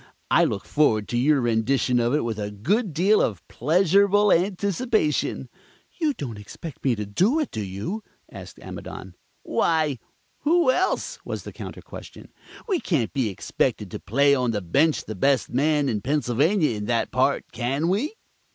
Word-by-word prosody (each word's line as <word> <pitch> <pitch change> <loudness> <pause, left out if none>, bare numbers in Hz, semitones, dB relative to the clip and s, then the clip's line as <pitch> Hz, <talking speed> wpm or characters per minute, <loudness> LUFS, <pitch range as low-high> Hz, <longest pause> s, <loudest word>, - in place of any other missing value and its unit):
I - - +5
look 100 - -3
forward 110 -9 +2
to 120 - -1
your 140 +2 +3
rendition 120 +2 +1
of 120 +3 +1
it 150 - +1
with 115 -2 -3
a 105 -1 -3
good 180 - 0
deal 190 +8 +3
of 95 -8 -2
pleasurable 195 - +3
anticipation." 195 - 0 0.5
"You 305 -4 +1
don't 115 -7 -6
expect 135 +9 -10
me 130 -3 +2
to 105 -1 -4
do 190 - +2
it, 305 - -2
do 110 - -4
you?" 100 - -5 0.3
asked - - -10
Amidon. - - -8 0.3
"Why, 155 -6 +1 0.4
who 320 -2 +3
else?" 370 +8 -1
was - - -5
the - - -9
counter - - -8
question. - - -11 0.3
"We 380 -6 +1
can't 140 - -1
be 130 -6 0
expected 95 - -2
to - - -5
play 140 +6 +3
on 125 -3 +1
the 105 -3 -1
bench 145 - +2
the 110 - -5
best 135 +7 +1
man 145 +2 +2
in 110 -5 -1
Pennsylvania 150 - +1
in 105 0 -4
that 115 +1 0
part, - - 0
can 135 +7 -1
we?" 225 - 0
145 Hz, 170 wpm, -24 LUFS, 115-190 Hz, 0.5 s, I